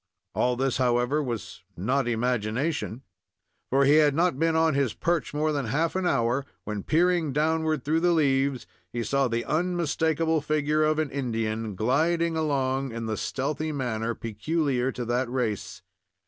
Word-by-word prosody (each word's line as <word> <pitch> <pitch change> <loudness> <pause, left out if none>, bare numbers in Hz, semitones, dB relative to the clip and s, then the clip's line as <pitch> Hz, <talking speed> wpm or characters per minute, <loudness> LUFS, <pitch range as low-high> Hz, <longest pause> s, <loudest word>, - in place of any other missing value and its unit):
All 125 0 +1
this, 130 0 0
however, 125 +3 +2
was 120 -7 -5 0.2
not 125 +8 0
imagination; 120 +3 -1 0.7
for 135 +1 +3
he 145 +3 +6
had 150 -2 +4
not 165 -4 +1
been 165 0 +2
on 160 -1 +3
his 135 -4 0
perch 170 -2 -1
more 155 +1 0
than 140 -5 -2
half 160 +9 0
an 190 -1 0
hour, 120 -1 +1 0.2
when, 105 -1 -4
peering 170 - +2
downward 155 -1 +1
through 160 +3 +1
the 175 +1 +3
leaves, 140 -4 +1 0.3
he 120 -1 -2
saw 135 +4 +1
the 115 0 -2
unmistakable 160 -1 0
figure 150 +1 +1
of 155 0 +2
an 155 -3 -1
Indian, 115 -5 -2
gliding 165 - +1
along 135 -4 0
in 115 0 -5
the 110 -1 -2
stealthy 150 +7 -2
manner 115 -5 -2
peculiar 130 +3 -1
to 125 -1 -5
that 120 +2 0
race. 120 -5 -3
140 Hz, 160 wpm, -26 LUFS, 120-155 Hz, 0.7 s, he